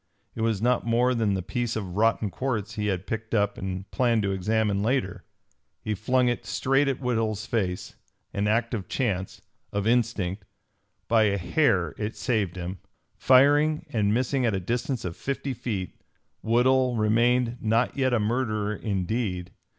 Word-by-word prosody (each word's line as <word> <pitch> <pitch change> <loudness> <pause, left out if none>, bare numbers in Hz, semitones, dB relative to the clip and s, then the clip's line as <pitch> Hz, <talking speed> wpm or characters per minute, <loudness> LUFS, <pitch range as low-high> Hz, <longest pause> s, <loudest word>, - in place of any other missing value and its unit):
It 115 - -5
was 110 -2 0
not 125 0 +2
more 120 +2 +2
than 110 -4 +1
the 95 - -3
piece 120 +3 -2
of 95 -5 -4
rotten 110 -1 +2
quartz 115 -4 -2
he 105 -2 -2
had 95 -2 -1
picked 110 0 -3
up 100 -1 +1
and 95 0 -5
planned 120 -4 +2
to 100 - 0
examine 100 +1 0
later. 105 -4 -1 0.6
He 110 - -1
flung 125 +5 +1
it 120 -1 -1
straight 135 +2 +1
at 135 -2 -1
Woodhull's 110 -4 -1
face 95 -6 -2 0.4
an 100 +1 0
act 115 +3 +1
of 105 -5 -3
chance, 95 -8 -2 0.3
of 100 0 -2
instinct. 110 -5 0 0.6
By 115 -2 +4
a 100 -1 +1
hair 90 - +1
it 105 +1 -3
saved 110 -8 -1
him. 90 +1 -5 0.4
Firing 145 +4 +4
and 105 -2 +2
missing 130 +3 +1
at 115 -4 +1
a - - 0
distance 120 +5 -2
of 85 -2 -4
fifty 140 0 -3
feet, 110 -7 -5 0.4
Woodhull 125 +2 +3
remained 120 +3 +2
not 115 +3 +1
yet 130 -2 +1
a 120 - +2
murderer 110 -2 -1
in 100 -4 -2
deed. 90 -5 -2
110 Hz, 165 wpm, -26 LUFS, 100-125 Hz, 0.6 s, By